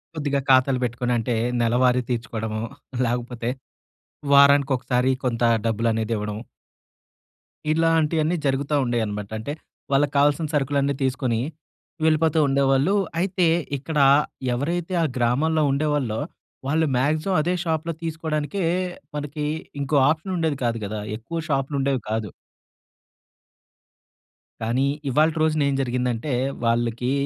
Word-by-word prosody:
కొద్దిగా 145 -2 0
ఖాతాలు 130 0 +4
పెట్టుకొనంటే, 120 0 -1 0.3
నెలవారీ 125 +2 +3
తీర్చుకోడము 110 -2 -3 0.4
లేకపోతే 120 0 -2 0.8
వారానికి 140 0 +6
ఒకసారి 125 0 0
కొంత 120 -2 -1 0.2
డబ్బులనేదివ్వడం. 110 -1 -1 1.4
ఇలాంటియన్నీ 165 0 +2
జరుగుతా 140 +2 0
ఉండేయనమాట 105 -4 -2
అంటే, 140 +7 -4 0.4
వాళ్ళకి 140 +1 +2
కావాల్సిన 145 +2 +3
సరుకులన్నీ 140 0 +1
తీసుకొని 130 -3 0 0.6
వెళ్ళిపోతూ 160 0 +3
ఉండేవాళ్ళు. 135 +5 +2 0.3
అయితే 180 -1 +1 0.3
ఇక్కడ 150 +3 -3 0.5
ఎవరైతే 170 +8 -2
ఆ - - +2
గ్రామంలో 145 +7 +2
ఉండేవాళ్ళో 140 -6 0 0.5
వాళ్ళు 160 +3 +2
మాక్సిమం 155 +8 +1
అదే 175 +4 0
షాప్‌లో 165 0 -1
తీసుకోడానికే 160 +2 -2 0.5
మనకి 150 +1 -4 0.4
ఇంకో 140 +2 -1
ఆప్‌షనుండేది 160 -2 -1
కాదు 115 -1 0
కదా! 105 +1 -4 0.2
ఎక్కువ 165 +9 -5
షాప్‌లుండేవి 135 -1 0
కాదు. 110 -2 -2 2.3
కానీ 120 +4 +1 0.2
ఇవాల్టి 155 +4 +2
రోజునేం 155 -3 +2
జరిగిందంటే, 125 +1 -1 0.3
వాళ్ళికి 120 +1 0
135 Hz, 95 wpm, -23 LUFS, 120-155 Hz, 2.3 s, వారానికి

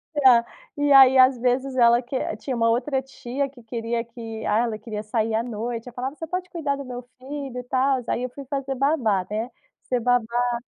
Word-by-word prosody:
E 290 -3 +4
a 235 -2 +6 0.3
e 290 0 +1
aí, 265 -1 +8
às 255 0 +6
vezes 255 +2 0
ela 235 -1 +5
que 255 +2 -7 0.2
tinha 260 +3 -4
uma 230 -1 +2
outra 265 +4 0
tia 270 +1 -4
que 260 -2 -16
queria 230 0 -3
que 225 -2 -8
ah, 210 - +2
ela 230 -2 -1
queria 215 -1 -6
sair 220 +1 -1
à 225 - +1
noite, 230 0 -5
ela 245 - -9
falava: 260 +4 -4
"Você 325 - -7
pode 365 +2 -4
cuidar 305 -6 -2
do 280 0 -7
meu 250 -1 -6 0.2
filho." 270 0 -6
E - - -6
tal, 260 +1 +1
aí 245 - -1
eu 255 - -2
fui 275 +3 -10
fazer 275 0 -3
babá 250 - +1
né. 220 +3 -3 0.4
Ser 250 - +1
babá. 245 0 +1
245 Hz, 220 wpm, -24 LUFS, 230-270 Hz, 0.4 s, aí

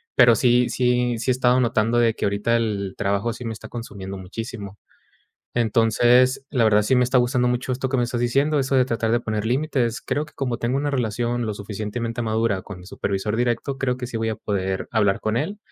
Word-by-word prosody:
Pero 120 -2 +7
sí 125 +2 +3
sí 125 -1 +1
sí 130 +3 0
he - - +3
estado 125 0 +3
notando 115 -1 +1
de 115 -1 +3
que - - -2
ahorita 100 +4 +1
el 100 -4 -2
trabajo 100 +3 0
sí 120 - -9
me 115 - -3
está 110 0 -10
consumiendo 100 -5 -7
muchísimo. 100 +1 -7 0.8
Entonces, 120 +3 +3
la 125 -5 +2
verdad 105 -1 +4
sí 120 +5 +2
me 125 - +4
está 125 +1 +2
gustando 125 0 +2
mucho 125 +1 -1
esto 130 +1 -2
que 135 - 0
me - - +2
estás 120 0 -3
diciendo, 140 +5 +2
eso 135 0 -1
de 130 - +5
tratar 115 -2 -1
de 120 - +2
poner 110 -2 -3
límites. 125 -2 0
Creo 150 +1 -1
que - - -19
como 125 -4 -2
tengo 120 +3 -1
una 145 +1 -1
relación 120 -1 -1
lo 110 - -2
suficientemente 110 +3 -4
madura 110 -3 0
con 105 -3 -9
mi 90 - -13
supervisor 100 +2 -2
directo, 120 +3 -1
creo 125 -2 0
que 125 -1 -5
sí 120 - -5
voy 115 - -1
a 110 - -3
poder 95 -2 -2
hablar 100 -3 +2
con 110 +1 -1
él, 185 - -3
120 Hz, 220 wpm, -23 LUFS, 110-125 Hz, 0.8 s, Pero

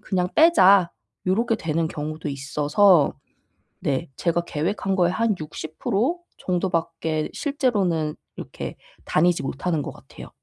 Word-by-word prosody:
그냥 180 -2 0
빼자.' 200 - +6 0.4
요렇게 225 +5 +1
되는 165 -1 -1
경우도 155 0 -5
있어서 145 +5 +3 0.7
네. 145 +4 -1
제가 170 0 +1
계획한 190 +5 -1
거의 175 -2 +3
한 225 0 +1
60% 180 - -2 0.2
정도밖에 165 -3 -1
실제로는 200 - 0 0.2
이렇게 - - -7 0.3
다니지 175 +2 +2
못하는 150 +4 -2
것 - - -5
같아요. - - -13
175 Hz, 260 characters per minute, -23 LUFS, 155-195 Hz, 0.7 s, 빼자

